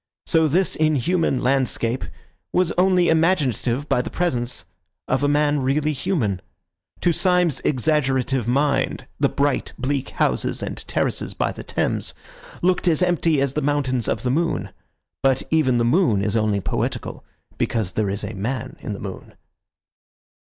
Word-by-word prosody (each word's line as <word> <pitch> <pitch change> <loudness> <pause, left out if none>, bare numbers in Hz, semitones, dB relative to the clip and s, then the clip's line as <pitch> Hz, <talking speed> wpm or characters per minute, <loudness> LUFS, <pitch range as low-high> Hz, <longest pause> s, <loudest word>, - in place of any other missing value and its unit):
So 160 -2 +3
this 180 +6 +2
inhuman 155 0 +1
landscape 130 -2 +1 0.5
was 180 -1 +2
only 180 -1 +3
imaginative 150 - +1
by 125 - +2
the - - -6
presence 125 - -1 0.4
of 130 - +1
a 145 - +2
man 145 0 +2
really 145 +3 +1
human. 130 - -1 0.6
To 175 - +3
Syme's 180 -3 +2
exaggerative 135 -3 +1
mind 135 +1 +1
the 140 -1 +3
bright, 140 -1 0
bleak 135 +1 -2
houses - - 0
and - - -4
terraces - - -1
by - - 0
the - - -8
Thames - - -2 0.5
looked 180 0 +2
as 170 +1 +3
empty 165 -4 +2
as 135 -1 +1
the 150 - -1
mountains 135 -5 0
of - - -1
the 125 - +1
moon. 165 +4 -1 0.5
But 135 -1 +2
even 145 -6 +3
the 115 - +2
moon 120 - +3
is 105 0 0
only 105 -2 +1
poetical - - -3 0.4
because 110 -6 0
there 105 0 -1
is 100 +2 -2
a 105 +2 -4
man 130 +6 -4
in 105 - -5
the 100 - -7
moon. 95 -2 -8
140 Hz, 155 wpm, -22 LUFS, 125-160 Hz, 0.6 s, So